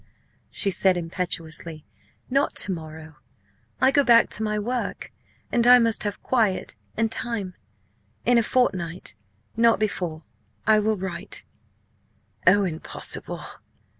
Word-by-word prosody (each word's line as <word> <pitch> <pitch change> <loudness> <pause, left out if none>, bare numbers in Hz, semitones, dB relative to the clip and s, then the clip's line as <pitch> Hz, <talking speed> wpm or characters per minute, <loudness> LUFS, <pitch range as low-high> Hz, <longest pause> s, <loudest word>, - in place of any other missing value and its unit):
she 200 - 0
said 185 0 +3
impetuously, 165 -2 -5 0.4
"not 275 +3 0
to 200 - +3
morrow; 160 -2 -8 0.6
I 260 +1 +5
go 285 +1 +4
back 235 -3 +5
to - - -1
my 210 -1 -1
work, 240 +4 -3 0.4
and 240 0 +2
I 250 0 +10
must 230 -2 +2
have 205 - -4
quiet 220 -7 0 0.2
and 225 0 +1
time. 225 -7 -2 0.7
In 245 0 +5
a - - +3
fortnight 185 -8 -1 0.4
not 230 0 +4
before. 175 -7 -2 0.4
I 215 0 +5
will 215 0 0
write." 180 -2 -5 1.0
"Oh, 200 +2 +6
impossible!" 165 -4 -1
205 Hz, 125 wpm, -24 LUFS, 175-230 Hz, 1.0 s, I